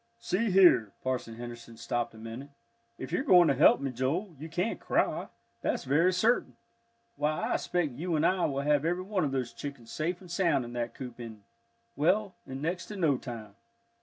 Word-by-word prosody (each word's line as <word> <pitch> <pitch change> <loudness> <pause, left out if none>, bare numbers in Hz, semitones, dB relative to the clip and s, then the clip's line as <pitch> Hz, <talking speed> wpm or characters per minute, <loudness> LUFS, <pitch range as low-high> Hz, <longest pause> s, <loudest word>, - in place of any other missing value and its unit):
"See 230 0 0
here," 180 - +5
Parson 125 -3 -2
Henderson 120 -1 -9
stopped 120 -1 -2
a - - -12
minute, 115 +5 -8 0.5
"if - - -7
you're - - +1
going 180 - +6
to - - +4
help 140 +5 +6
me, 135 -1 -2
Joel, 155 - -2
you 160 +2 -7
can't 180 +7 -1
cry, - - 0 0.3
that's - - -1
very 150 +7 +3
certain. 220 +7 +1 0.6
Why, 150 +1 0
I - - +2
expect 175 -5 0
you 165 +7 -2
and 155 +1 +2
I 185 0 +3
will 140 -1 -1
have 145 0 +2
every 175 +3 0
one 195 -2 -1
of 145 - 0
those 130 -3 -2
chickens 140 -5 -8
safe 170 +3 -2
and 180 -3 -13
sound 170 -8 +2
in 120 - -8
that 120 -1 -3
coop 125 -2 -8
in 110 -3 -9 0.5
well, 185 +6 +2
in 135 +2 -6
next 175 +3 -2
to 210 - -7
no 160 -8 +2
time." 115 -6 -8
150 Hz, 195 wpm, -30 LUFS, 120-180 Hz, 0.6 s, going